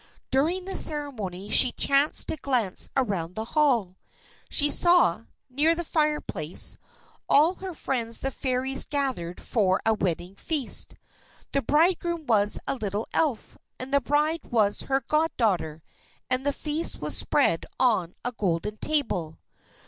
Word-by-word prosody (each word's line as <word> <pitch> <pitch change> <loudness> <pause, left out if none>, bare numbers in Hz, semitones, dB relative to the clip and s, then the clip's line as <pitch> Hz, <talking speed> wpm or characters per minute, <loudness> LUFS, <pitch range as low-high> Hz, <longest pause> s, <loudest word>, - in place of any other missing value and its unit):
During 330 +8 +1
the 385 - -5
ceremony 215 - -1
she 250 - +4
chanced 280 +2 +1
to - - +1
glance 250 -9 0
around 190 -9 -1
the 220 - -4
hall. 240 -12 +2 0.5
She 290 - +4
saw, 345 - +3 0.2
near 295 +6 +2
the 345 - -3
fireplace, 300 - -1 0.5
all 315 +5 +5
her 375 -2 -8
friends 230 -5 -2
the 270 - -2
Fairies 265 0 -1
gathered 260 - -2
for 195 -5 +1
a 225 - +3
wedding 180 -3 -2
feast. 280 +6 0 0.6
The 275 - +1
bridegroom 335 +4 +1
was 210 -4 +3
a - - 0
little 210 -1 -3
Elf, 290 -8 -1 0.2
and 260 +2 -6
the 280 - +4
bride 300 +5 0
was 210 -4 +1
her 270 0 0
goddaughter, 215 - 0 0.5
and 255 +2 0
the - - +3
feast 305 +3 0
was - - 0
spread - - +2
on 215 -9 +1
a 245 - -1
golden 210 -1 -2
table. 190 - -2
255 Hz, 140 wpm, -26 LUFS, 205-300 Hz, 0.6 s, all